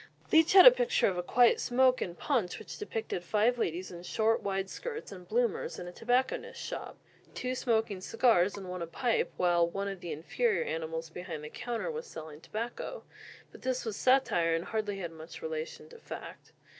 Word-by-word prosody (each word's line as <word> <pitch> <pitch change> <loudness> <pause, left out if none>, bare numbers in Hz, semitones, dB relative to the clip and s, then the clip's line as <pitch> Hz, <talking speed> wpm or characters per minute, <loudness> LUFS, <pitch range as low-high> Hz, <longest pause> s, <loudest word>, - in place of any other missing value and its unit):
Leech 320 +2 +5
had 380 -1 +10
a - - +13
picture - - +2
of 190 - 0
"A 180 - -1
Quiet 235 +6 +4
Smoke" 255 0 +3
in 175 - -3
Punch, 225 -6 0
which - - -9
depicted 225 - -4
five 220 +6 +2
ladies 180 -2 -2
in 175 -1 -8
short 220 +5 +1
wide 195 -1 -1
skirts 455 - -6
and 180 -2 -10
"bloomers" 235 +1 0
in 175 - -6
a - - -6
tobacconist's 245 +7 -1
shop, - - -6 0.4
two 255 0 -2
smoking 220 -6 0
cigars 200 -3 +3
and 195 -2 -7
one 180 -1 -5
a 170 - -3
pipe, 235 +8 0
while 175 -1 +3
"one 195 +3 -3
of 195 -2 -5
the 175 - -6
inferior 435 - 0
animals" 160 0 -4
behind 170 -3 -6
the 150 - -6
counter 240 - -3
was 475 +1 -6
selling 155 -1 -9
tobacco. 235 - -5 0.5
But - - -14
this 255 -1 -1
was 220 -3 -3
satire 185 -12 +3
and 165 - -2
hardly 210 -2 -2
had 175 -4 -5
much 160 - -10
relation 475 -1 -5
to 470 0 -13
fact. - - -9
215 Hz, 195 wpm, -31 LUFS, 175-255 Hz, 0.5 s, a